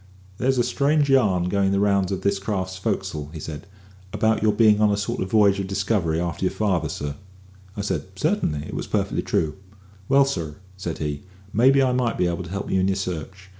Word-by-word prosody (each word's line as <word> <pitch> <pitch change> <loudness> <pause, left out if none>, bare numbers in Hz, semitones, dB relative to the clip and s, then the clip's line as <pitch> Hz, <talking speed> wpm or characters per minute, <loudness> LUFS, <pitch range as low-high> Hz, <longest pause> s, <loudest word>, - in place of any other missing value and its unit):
"There's 130 +1 +1
a 120 - +3
strange 145 +2 +2
yarn 100 -10 +3
going 95 +1 +1
the 100 - +2
rounds 100 -2 +2
of 95 - -2
this 100 0 +1
here 95 - -12
craft's 95 -3 -2
fo'c'sle," 95 -7 -3
said 75 0 -6
he, 95 - -18 0.5
"about 110 +1 +1
your 110 0 +4
bein' 105 -1 +4
on 105 - +5
a 100 - +1
sort 100 - -2
of 95 - -2
v'yage 100 -2 +4
of 95 - -3
discovery 100 -4 0
a'ter 85 -2 -3
your - - +3
father, 95 -6 0
sir." 75 0 -4 0.6
I - - -1
said, 100 - -2
"Certainly; 75 0 0
it - - -8
was - - -4
perfectly - - 0
true." 75 -1 -1 0.5
"Well, 140 0 +6
sir," 85 - -3 0.2
said 85 -3 -5
he, 75 -2 -3 0.3
"maybe 135 +5 +5
I 130 - +2
might 125 -2 0
be 90 - +2
able 85 +1 -1
to - - -9
help 100 +2 -4
you 95 - +2
in 95 - +2
your 95 - +1
search. 95 0 -5
95 Hz, 220 wpm, -23 LUFS, 90-110 Hz, 0.6 s, Well